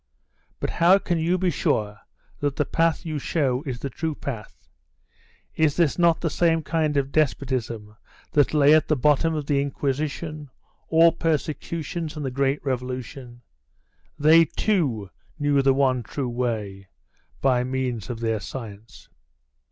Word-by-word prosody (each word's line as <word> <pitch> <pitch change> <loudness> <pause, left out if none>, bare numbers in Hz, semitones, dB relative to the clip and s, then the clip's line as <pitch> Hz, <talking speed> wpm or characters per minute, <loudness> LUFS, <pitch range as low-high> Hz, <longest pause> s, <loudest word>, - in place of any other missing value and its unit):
"But - - -2
how 175 +3 +5
can 175 -4 -1
you 170 +3 +1
be 185 -1 +1
sure 105 -7 -1 0.4
that 145 -1 -1
the 150 - 0
path 165 +3 0
you 155 -2 -3
show 135 -4 0
is 125 -2 -3
the 135 - -5
true 160 +4 -3
path? 115 -8 -8 0.9
Is 155 -2 +2
this 170 -2 +2
not 170 -1 +3
the 165 - 0
same 165 0 +2
kind 155 -1 0
of 140 0 0
despotism 125 -8 -1 0.4
that 145 -2 +3
lay 150 -1 +5
at 155 - +4
the 155 - +2
bottom 150 +4 +2
of 150 -2 -3
the 140 -1 +1
Inquisition, 145 +2 -3 0.4
all 165 +1 +5
persecutions, 160 0 -3
and 150 - -4
the 130 - -2
great 140 +2 0
revolution? 125 -1 -5 0.7
They, 160 +3 +6
too, 135 - -1 0.3
knew 145 -2 +2
the 135 -1 +3
one 130 -2 +2
true 130 +1 -4
way, 110 -6 -3 0.5
by 125 -2 +2
means 125 -4 -3
of 115 -2 -5
their 115 -2 0
science." 110 0 -9
140 Hz, 150 wpm, -24 LUFS, 125-160 Hz, 0.9 s, They